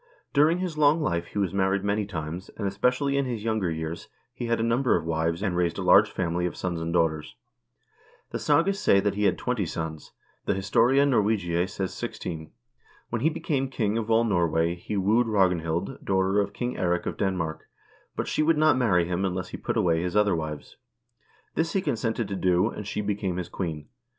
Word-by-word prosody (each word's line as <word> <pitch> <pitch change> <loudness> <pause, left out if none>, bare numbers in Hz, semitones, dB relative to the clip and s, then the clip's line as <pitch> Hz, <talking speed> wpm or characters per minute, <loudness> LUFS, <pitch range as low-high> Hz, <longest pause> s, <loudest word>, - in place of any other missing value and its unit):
During 150 +4 +4
his 180 -4 -3
long 150 +2 +5
life 85 - -1
he - - -8
was 100 -2 0
married 95 0 +1
many 100 0 0
times, 85 0 -5
and, 100 - -2
especially 125 +8 +1
in 140 - +1
his 120 -4 -4
younger 110 -5 0
years, 80 +2 -5 0.3
he 120 - -5
had 115 0 +1
a - - 0
number 120 +3 +2
of 85 - -1
wives, 80 +3 -1
and 95 -4 0
raised 85 -1 0
a 100 - -3
large 100 +4 +6
family 90 -2 -1
of - - -6
sons 85 -3 -3
and 80 0 -3
daughters. 80 -7 0 1.0
The - - -3
sagas 195 +4 +2
say 100 - +4
that 100 0 0
he 105 +1 0
had - - +2
twenty 125 -7 -1
sons; 80 -1 -5 0.3
the - - +1
"Historia 115 +8 +3
Norwegiae" 100 -8 +1
says 95 -1 -4
sixteen. 80 -3 -6 0.6
When - - -1
he 160 - +3
became 140 -4 -2
king 110 -5 -1
of 115 -1 -2
all 115 +1 +4
Norway, 85 -5 +1
he 90 +4 -5
wooed 110 +5 +3
Ragnhild, 90 0 0
daughter 95 +1 +2
of 100 0 0
King 120 +4 -4
Eirik 90 -2 0
of - - -3
Denmark, 85 -5 -2 0.5
but - - -2
she - - 0
would 160 +1 +3
not 155 +1 +4
marry 90 -9 +3
him 90 +2 -2
unless 95 -1 -2
he - - -6
put - - -3
away 85 -2 +2
his 90 +1 -3
other 105 -3 +3
wives. 75 -2 -6 0.8
This 165 +1 -1
he 195 - +1
consented 115 -5 -1
to 100 - -4
do, 90 +2 +2
and 105 - -7
she 105 - -2
became 100 -3 -2
his 90 -2 -4
queen. 80 -5 -4
100 Hz, 205 wpm, -26 LUFS, 85-115 Hz, 1.0 s, large